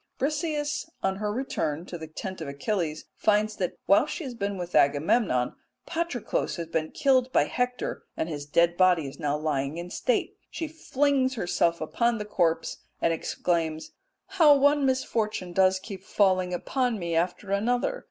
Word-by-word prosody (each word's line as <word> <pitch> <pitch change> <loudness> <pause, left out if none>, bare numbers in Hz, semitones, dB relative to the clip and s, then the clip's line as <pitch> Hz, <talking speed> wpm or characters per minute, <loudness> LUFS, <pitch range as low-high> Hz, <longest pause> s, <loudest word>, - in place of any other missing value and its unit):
Briseis 300 +2 -1
on 190 0 0
her 210 0 -2
return 170 - -2
to 180 - -8
the 160 -2 -7
tent 185 +3 -6
of 160 - -4
Achilles 155 +2 -2
finds 215 0 +2
that 180 -2 -2
while 200 +9 +5
she 345 - -4
has 260 -4 -5
been 200 -3 -3
with 175 -1 -6
Agamemnon, 140 - +3 0.3
Patroclus 335 -8 -2
has 170 - -4
been 160 -1 -2
killed 260 -2 +2
by - - +4
Hector, 250 0 -2 0.2
and - - -1
his 145 -3 -5
dead 170 +3 +3
body 180 -5 +4
is 135 +1 -10
now 145 0 0
lying 150 -1 -1
in 175 +1 -6
state. - - -1
She 325 - -4
flings 280 -4 +1
herself 175 -4 +1
upon 235 +9 +1
the 210 - -4
corpse 170 -5 0 0.2
and 165 - +2
exclaims 165 -1 -2 0.3
"How 330 -7 +6
one 285 0 +4
misfortune 215 -8 -1
does 190 +1 +4
keep 190 0 -8
falling 185 -3 +2
upon 245 +6 -1
me 170 -3 -3
after 180 +4 -1
another! 245 - +1
190 Hz, 165 wpm, -27 LUFS, 165-255 Hz, 0.3 s, How